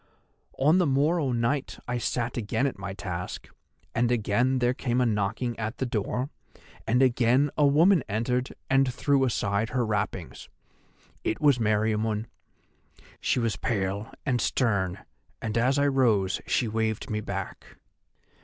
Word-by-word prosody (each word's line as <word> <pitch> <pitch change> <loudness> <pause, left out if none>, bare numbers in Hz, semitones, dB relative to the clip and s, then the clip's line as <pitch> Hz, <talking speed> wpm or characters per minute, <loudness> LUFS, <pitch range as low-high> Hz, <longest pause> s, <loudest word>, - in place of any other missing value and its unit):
"On 155 +7 +4
the 180 - +3
morrow 145 +1 +2
night 120 +4 -1
I 125 0 -1
sat 120 +1 -2
again 115 +2 -1
at 135 -8 -2
my 100 0 -5
task, 90 -3 -5 0.5
and 120 +1 +1
again 120 +3 +1
there 125 0 +2
came 125 -1 -1
a 125 - +3
knocking 110 +2 -1
at 110 +1 -3
the 130 - -1
door, 125 +4 -2 0.6
and 125 +4 +3
again 130 +3 +3
a 150 - +4
woman 165 +3 +5
entered 125 +5 -1
and 135 -1 +3
threw 135 +2 +2
aside 105 -3 0
her 125 -2 0
wrappings. 105 -5 -3 0.7
It - - -1
was 145 -5 +4
Meriamun. 110 0 +1 0.9
She - - +1
was 115 -4 -1
pale 100 0 -2
and 125 -5 +1
stern, 100 -7 0 0.3
and 110 -1 -4
as 125 +4 +2
I 140 - +3
rose 115 -9 +2
she 120 - +1
waved 110 0 -2
me 105 0 -1
back. 100 -2 -6
120 Hz, 145 wpm, -27 LUFS, 105-130 Hz, 0.9 s, woman